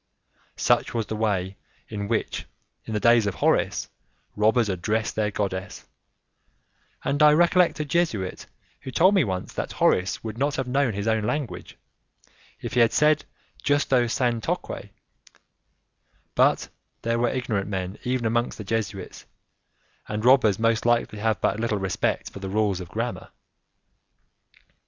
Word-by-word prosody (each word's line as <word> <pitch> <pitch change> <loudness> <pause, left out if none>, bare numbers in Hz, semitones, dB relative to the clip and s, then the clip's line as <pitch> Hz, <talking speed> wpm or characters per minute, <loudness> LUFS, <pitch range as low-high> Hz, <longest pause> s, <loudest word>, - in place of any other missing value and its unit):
Such - - +2
was 115 -2 0
the 110 - -4
way 100 -3 -1 0.3
in 100 -2 -4
which, 115 0 -2 0.4
in 110 - -4
the - - +1
days 115 -1 +4
of 100 - -2
Horace, 75 - +1 0.5
robbers 110 +2 +3
addressed 105 +4 -1
their 105 -1 +1
goddess, 95 -1 -4 1.2
and 145 +2 0
I 150 0 +8
recollect 175 +1 +3
a 150 - -1
Jesuit 140 - -1 0.3
who - - -8
told 180 +9 +4
me 190 -5 +4
once 95 -5 -4
that - - -4
Horace 90 +1 +1
would 110 0 -6
not 140 +1 +1
have 130 -3 -2
known 130 -2 +1
his 100 +2 -3
own 110 -1 +1
language, 145 +1 -4 0.8
if - - -5
he 125 - +2
had 115 -1 +4
said 150 0 +3 0.4
justo 140 -4 +2
sanctoque: 120 -1 -2 1.4
but - - +3 0.3
there 115 0 0
were 120 0 +2
ignorant 115 -6 -2
men 95 0 -4
even 125 -1 -1
amongst 120 +2 0
the 105 - -6
Jesuits, 100 -3 -4 0.8
and 105 +1 -3
robbers 125 -6 +5
most 115 0 +1
likely 120 -3 +1
have 110 -1 0
but 100 - +1
little 115 -2 0
respect 95 -2 -1
for - - -9
the 95 -1 -5
rules 100 -2 +1
of 90 - -9
grammar. 115 +6 -4
110 Hz, 145 wpm, -25 LUFS, 100-125 Hz, 1.4 s, I